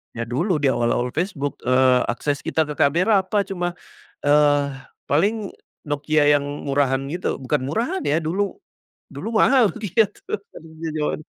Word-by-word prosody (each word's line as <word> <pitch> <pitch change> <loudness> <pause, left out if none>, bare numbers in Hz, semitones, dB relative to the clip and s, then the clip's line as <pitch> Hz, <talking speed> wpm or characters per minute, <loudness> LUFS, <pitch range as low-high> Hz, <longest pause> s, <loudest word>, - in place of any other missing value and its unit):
ya 115 - -4
dulu 150 - 0
di 140 - +3
awal-awal 120 +1 0
Facebook, 155 -4 -3
eee, 130 0 +4
akses 140 +4 -1
kita 160 - +1
ke 150 -1 -7
kamera 180 +9 +4
apa, 205 +1 +1
cuma, 175 -2 -3 0.5
eee, 145 -1 +4 0.4
paling 200 +8 0 0.3
Nokia 145 +1 +1
yang 145 - -2 0.2
murahan 135 -1 +1
gitu 180 - -2
bukan 130 -1 -1
murahan 235 - -1
ya, 150 +3 +2
dulu 185 +5 -2 0.5
dulu 145 +11 -6
mahal 250 -6 +5
gitu 210 0 0 0.6
di 165 - -3
jaman 150 0 -1
150 Hz, 145 wpm, -22 LUFS, 140-195 Hz, 0.6 s, mahal